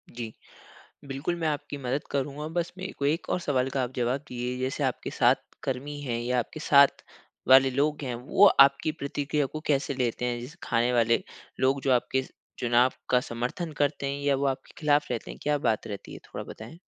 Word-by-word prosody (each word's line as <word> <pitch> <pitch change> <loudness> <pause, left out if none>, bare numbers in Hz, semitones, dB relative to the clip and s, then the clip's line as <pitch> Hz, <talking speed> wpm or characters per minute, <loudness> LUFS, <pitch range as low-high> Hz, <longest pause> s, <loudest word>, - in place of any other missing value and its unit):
जी। 115 -2 -5 0.7
बिल्कुल, 140 +5 -3
मैं 165 -2 -1
आपकी 145 -1 -3
मदद 135 +2 -2
करूँगा 140 +2 -2
बस 170 0 -1
मेरे 190 +1 -5
को 140 - -2
1 155 +4 0
और - - +1
सवाल 135 -6 0
का 135 0 0
आप 125 0 -3
जवाब 125 +2 0
दीजिए 125 0 -3
जैसे 130 +3 -2
आपके 130 -2 -2
साथ - - +4 0.3
कर्मी 145 +3 -4
हैं 125 -5 -2
या 125 +1 0
आपके 140 +6 -3
साथ 140 -2 +5 0.5
वाले 135 0 +8
लोग 145 +3 0
हैं, 125 -3 -3
वो 130 +12 +4
आपकी 140 0 +5
प्रतिक्रिया 145 -1 -2
को 155 +3 -7
कैसे 140 -1 +1
लेते 125 -2 -1
हैं? 120 -1 -1
जैसे 125 +5 -9
खाने 120 0 +1
वाले 115 -1 +3 0.4
लोग 135 +1 +2
जो 135 - +2
आपके 130 +1 +1 0.4
चुनाव 120 +1 +3 0.2
का 125 - +5
समर्थन 125 +8 -3
करते 145 -1 0
हैं? 140 +1 -3
या 140 -1 +3
वो 140 +1 0
आपके 135 -1 -3
ख़िलाफ 150 -1 +2
रहते 120 -2 -3
हैं, - - -9
क्या 150 0 +1
बात 110 - 0
रहती 100 -2 -7
है - - -8
थोड़ा - - -5
बताएँ? 115 +10 -10
135 Hz, 200 wpm, -27 LUFS, 125-145 Hz, 0.7 s, वाले